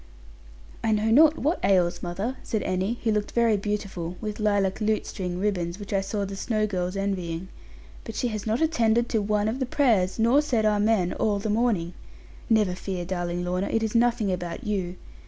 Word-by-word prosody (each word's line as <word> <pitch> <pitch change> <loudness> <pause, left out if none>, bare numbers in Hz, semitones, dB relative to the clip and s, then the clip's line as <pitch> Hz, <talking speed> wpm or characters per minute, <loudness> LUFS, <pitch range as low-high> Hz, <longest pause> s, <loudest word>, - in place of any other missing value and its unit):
'I 220 - +2
know 215 +1 +1
not 310 +5 +6
what 315 +5 0
ails 180 -3 +2
mother,' 195 +9 -3
said 220 - -2
Annie, 190 +6 -1
who 225 - +2
looked 210 -1 -1
very 230 -2 +3
beautiful, 200 -4 -3
with 210 -1 -5
lilac 205 -1 +1
lute 215 0 +1
string 180 -2 -4
ribbons, 180 -4 -1
which 205 0 -6
I 195 - +2
saw 200 +1 -2
the 195 0 -6
Snowe 215 +1 0
girls 185 -2 -2
envying; 185 -3 -3 0.5
'but 225 - -8
she 245 - 0
has 215 -1 -4
not 220 +5 0
attended 235 -6 +2
to 220 - +1
one 210 0 +1
of 230 +4 -2
the 260 - -1
prayers, 225 -10 +2
nor 235 +6 +4
said 240 -7 0
"Amen," 210 -3 +2
all 210 -2 0
the 205 +1 -2
morning. 210 -7 +1 0.6
Never 215 -5 +3
fear, 185 -1 -4
darling 175 -1 -2
Lorna, 180 +2 -1
it 225 - 0
is 220 - -1
nothing 230 -3 +2
about 175 -2 -4
you. 190 -4 -2
210 Hz, 195 wpm, -26 LUFS, 185-225 Hz, 0.6 s, not